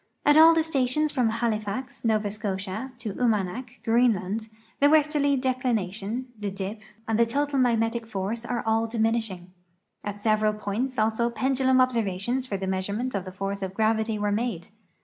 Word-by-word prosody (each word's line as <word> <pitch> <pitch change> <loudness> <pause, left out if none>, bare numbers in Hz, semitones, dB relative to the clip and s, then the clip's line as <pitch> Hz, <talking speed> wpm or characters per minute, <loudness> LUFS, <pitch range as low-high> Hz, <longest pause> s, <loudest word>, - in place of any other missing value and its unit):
At 295 - +6
all 325 +1 +8
the 325 - +3
stations 300 0 +1
from 250 -6 +1
Halifax, 225 +1 -3
Nova 215 -3 +1
Scotia, 205 +3 -4
to 225 -4 -5
Umanak, 230 +2 -1
Greenland, 225 -2 +1 0.3
the 285 0 +5
westerly 295 -2 +3
declination, 240 -3 -1
the 205 -1 -2
dip^ 195 +2 -5 0.3
and 225 0 +1
the 235 - +6
total 285 +3 0
magnetic 230 -2 +1
force 215 +2 -3
are 240 0 -2
all 225 +1 +2
diminishing. 220 -5 -1 0.5
At 205 0 -5
several 215 0 +2
points 215 +5 -3
also 225 +2 +1
pendulum 260 +1 +2
observations 240 0 0
for 200 - -2
the 190 - -4
measurement 200 +7 -2
of 195 -2 -2
the 185 - -7
force 195 +1 -4
of 190 0 -4
gravity 220 0 +1
were 205 0 0
made. 210 -5 -2
225 Hz, 160 wpm, -26 LUFS, 205-255 Hz, 0.5 s, all